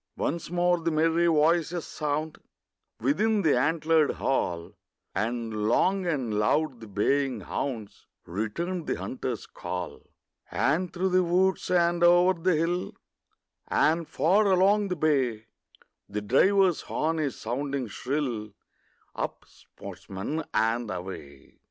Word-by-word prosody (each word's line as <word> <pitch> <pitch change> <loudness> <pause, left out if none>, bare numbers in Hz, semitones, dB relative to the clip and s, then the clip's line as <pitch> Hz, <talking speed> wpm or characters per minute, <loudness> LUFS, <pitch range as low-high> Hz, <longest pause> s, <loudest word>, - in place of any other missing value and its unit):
Once 165 +1 -2
more 175 0 +2
the 165 0 -1
merry 165 +2 +2
voices 165 +1 +2
sound 150 +1 -3 0.6
Within 205 - +2
the 155 - +4
antlered 155 +3 +2
hall, 85 -10 -2 0.4
And 110 -1 -2
long 185 +9 +2
and 125 -10 -1
loud 130 +4 +1
the 110 - -10
baying 125 +4 0
hounds 110 +1 -5 0.2
Return 155 - -3
the - - -1
hunter's 125 -3 -4
call; - - -6 0.5
And 170 +6 0
through 190 +1 -1
the 185 0 +3
woods, 185 +2 +1
and 175 -1 +2
o'er 175 +2 +6
the 175 0 +1
hill, 170 +3 -1 0.7
And 165 +1 +2
far 200 +6 +2
along 200 +2 +4
the 180 - -2
bay, 135 -9 +1 0.6
The 105 +1 -3
driver's 185 - +3
horn 160 +1 -1
is 145 -5 -2
sounding 135 +3 -2
shrill, 120 -3 -3 0.6
Up, - - -5
sportsmen, 100 +12 -7
and 115 +1 +1
away! 90 -7 -8
155 Hz, 120 wpm, -27 LUFS, 120-175 Hz, 0.7 s, o'er